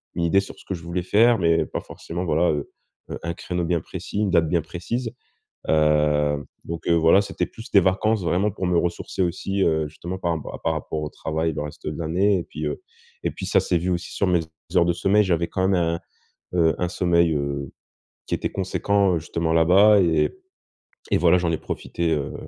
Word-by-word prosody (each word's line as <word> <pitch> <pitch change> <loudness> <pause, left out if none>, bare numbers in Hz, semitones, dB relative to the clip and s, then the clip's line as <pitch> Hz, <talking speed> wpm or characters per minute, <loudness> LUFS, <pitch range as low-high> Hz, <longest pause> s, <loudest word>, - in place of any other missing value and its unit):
une 85 - -1
idée 95 +4 +4
sur - - -10
ce - - -17
que 95 - -4
je 85 - -10
voulais 85 +1 -3
faire, 115 +5 +4
mais 85 -2 +3
pas - - -4
forcément 85 +2 -6
voilà, 85 +1 +2
heu 75 -2 -3 0.4
heu, - - -5
un 85 - -2
créneau 90 +1 -3
bien 85 -1 +1
précis, 95 +4 -6
une 105 -2 +1
date 80 -2 +3
bien 85 -2 +2
précise. 100 +9 -4 0.6
Heu, 75 -2 +2 0.2
donc 85 -1 -6
heu, 85 - +4
voilà, 85 +4 +5
c'était 100 - -2
plus 115 - -11
des 100 - +7
vacances 95 +3 +1
vraiment 95 +5 +1
pour 95 -1 -4
me 90 - +2
ressourcer 85 +2 -2
aussi, 95 +2 0
heu, 80 -3 +1
justement 85 +4 -6
par 85 -2 -1
ra - - -7
par - - +2
rapport 80 - -4
au 75 - -3
travail, 80 +2 -2
le 75 - -3
reste 75 +1 -8
de 75 - -3
l'année 95 +5 +2
et 85 - -4
puis, 75 - -6
heu, - - -4 0.4
et - - 0
puis - - -7
ça - - +4
s'est 90 - +1
vu 90 +1 0
sur 100 - -2
mes 90 -1 +3 0.4
heures 85 -1 +5
de 85 - +2
sommeil, 100 +4 +3
j'avais 85 -2 +1
quand 95 +2 0
même 95 - +3
un, 85 -1 0 0.6
heu, 80 -1 +3
un 90 - 0
sommeil, 85 -2 +2
heu, 70 -1 -3 0.6
qui - - -1
était - - -3
conséquent, 100 0 +1
heu, 85 - +1
justement 80 +1 -2
là 80 0 +4
bas 100 +4 +6
et 85 -3 +2 0.8
et - - +4
voilà 90 +1 +5
j'en 85 -2 0
ai 80 - 0
profité, 85 -1 -2
heu, 70 -3 -2
85 Hz, 220 wpm, -23 LUFS, 80-95 Hz, 0.8 s, des